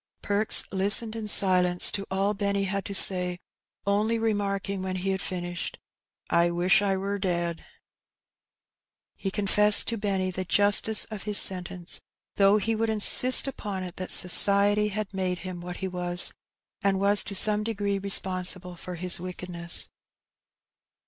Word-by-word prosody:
Perks 205 Hz, +1 st, +1 dB
listened 205 Hz, +4 st, +2 dB
in 220 Hz, -2 st, -7 dB
silence 180 Hz, -3 st, +3 dB
to 200 Hz, -1 st, -6 dB
all 195 Hz, +2 st, -2 dB
Benny 200 Hz, -1 st, -3 dB
had 195 Hz, 0 st, -5 dB
to 200 Hz, -, -8 dB
say, 180 Hz, -2 st, +6 dB, 0.5 s
only 210 Hz, +3 st, -2 dB
remarking 200 Hz, -3 st, -4 dB
when 185 Hz, 0 st, -6 dB
he 190 Hz, +1 st, -4 dB
had 190 Hz, -1 st, -5 dB
finished, 175 Hz, -1 st, -7 dB, 0.3 s
" -, -, -68 dB
I 170 Hz, +1 st, +1 dB
wish 175 Hz, +4 st, 0 dB
I 195 Hz, -1 st, -2 dB
wur 200 Hz, +1 st, -5 dB
dead/' 170 Hz, -3 st, -5 dB, 1.5 s
He 195 Hz, -, -6 dB
confessed 205 Hz, +1 st, +2 dB
to 230 Hz, -2 st, -5 dB
Benny 190 Hz, -2 st, -3 dB
the 185 Hz, +1 st, -6 dB
justice 205 Hz, +4 st, +4 dB
of 215 Hz, -2 st, -9 dB
his 205 Hz, -, +2 dB
sentence, 180 Hz, -2 st, -2 dB, 0.4 s
though 200 Hz, +1 st, +2 dB
he 225 Hz, +2 st, -3 dB
would, 225 Hz, +1 st, -3 dB
insist 235 Hz, +5 st, +6 dB
upon 205 Hz, -8 st, -7 dB
it 180 Hz, -1 st, -11 dB
that 185 Hz, -, -8 dB
society 200 Hz, +3 st, +3 dB
had 210 Hz, 0 st, -7 dB
made 185 Hz, -1 st, -4 dB
him 180 Hz, -2 st, -9 dB
what 180 Hz, 0 st, -9 dB
he -, -, -4 dB
was, 180 Hz, -1 st, -2 dB, 0.5 s
and 195 Hz, -2 st, -2 dB
was 200 Hz, +1 st, +3 dB
to 200 Hz, -, -6 dB
some 210 Hz, +2 st, +3 dB
degree 205 Hz, -3 st, -4 dB
responsible 185 Hz, -2 st, +1 dB
for 180 Hz, +1 st, -10 dB
his 180 Hz, +1 st, +1 dB
wickedness. 180 Hz, -1 st, -2 dB
195 Hz, 155 wpm, -24 LUFS, 180-205 Hz, 1.5 s, say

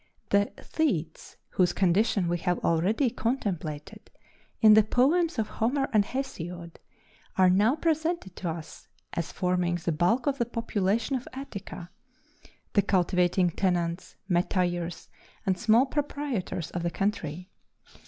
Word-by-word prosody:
The 200 Hz, 0 st, +3 dB
Thetes, 170 Hz, -, -2 dB
whose 180 Hz, -1 st, +2 dB
condition 195 Hz, +1 st, +2 dB
we 175 Hz, 0 st, 0 dB
have 180 Hz, 0 st, 0 dB
already 205 Hz, -, +2 dB
contemplated 185 Hz, -, -3 dB, 0.5 s
in 215 Hz, -2 st, +8 dB
the 215 Hz, -, +8 dB
poems 295 Hz, -, +2 dB
of 220 Hz, -2 st, 0 dB
Homer 270 Hz, +5 st, 0 dB
and 210 Hz, -2 st, +5 dB
Hesiod, 175 Hz, -9 st, -6 dB, 0.6 s
are 185 Hz, -1 st, +6 dB
now 210 Hz, +8 st, +4 dB
presented 320 Hz, -, -1 dB
to 180 Hz, -, -3 dB
us 160 Hz, -1 st, -8 dB, 0.3 s
as 170 Hz, -, -3 dB
forming 180 Hz, -1 st, 0 dB
the 175 Hz, 0 st, -2 dB
bulk 180 Hz, +11 st, +1 dB
of 280 Hz, -1 st, 0 dB
the 235 Hz, -, +2 dB
population 230 Hz, +1 st, 0 dB
of 255 Hz, -, -4 dB
Attica 200 Hz, -9 st, -8 dB, 0.8 s
the 200 Hz, -, +5 dB
cultivating 180 Hz, -1 st, +2 dB
tenants, 175 Hz, -1 st, -1 dB
metayers, 175 Hz, -1 st, 0 dB, 0.4 s
and 190 Hz, -, +2 dB
small 225 Hz, +7 st, +4 dB
proprietors 280 Hz, -, -3 dB
of 175 Hz, -, -3 dB
the 170 Hz, -, 0 dB
country. 180 Hz, -3 st, -3 dB
195 Hz, 130 wpm, -28 LUFS, 175-235 Hz, 0.8 s, in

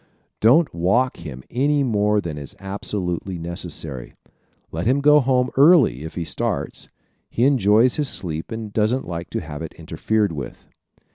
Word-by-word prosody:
Don't 140 Hz, +8 st, +4 dB
walk 100 Hz, +10 st, +1 dB
him 70 Hz, -6 st, -9 dB
any 140 Hz, +3 st, +2 dB
more 105 Hz, -3 st, +1 dB
than 85 Hz, -5 st, -5 dB
is 70 Hz, -2 st, -7 dB
absolutely 95 Hz, -2 st, -4 dB
necessary. 80 Hz, -6 st, -5 dB, 0.6 s
Let 85 Hz, +6 st, -3 dB
him 130 Hz, +3 st, +3 dB
go 150 Hz, +1 st, +6 dB
home 130 Hz, -1 st, +1 dB
early 140 Hz, -, +5 dB
if 80 Hz, -, -8 dB
he 85 Hz, -, -3 dB
starts. 75 Hz, -, -3 dB, 0.4 s
He 120 Hz, -, -1 dB
enjoys 120 Hz, -2 st, +4 dB
his 145 Hz, -3 st, 0 dB
sleep 80 Hz, -4 st, -5 dB
and 110 Hz, -2 st, -6 dB
doesn't 110 Hz, +5 st, 0 dB
like 85 Hz, 0 st, -5 dB
to -, -, -3 dB
have 75 Hz, -2 st, -8 dB
it 80 Hz, -, -6 dB
interfered 90 Hz, +6 st, -1 dB
with. 70 Hz, -4 st, -7 dB
105 Hz, 155 wpm, -22 LUFS, 85-125 Hz, 0.6 s, go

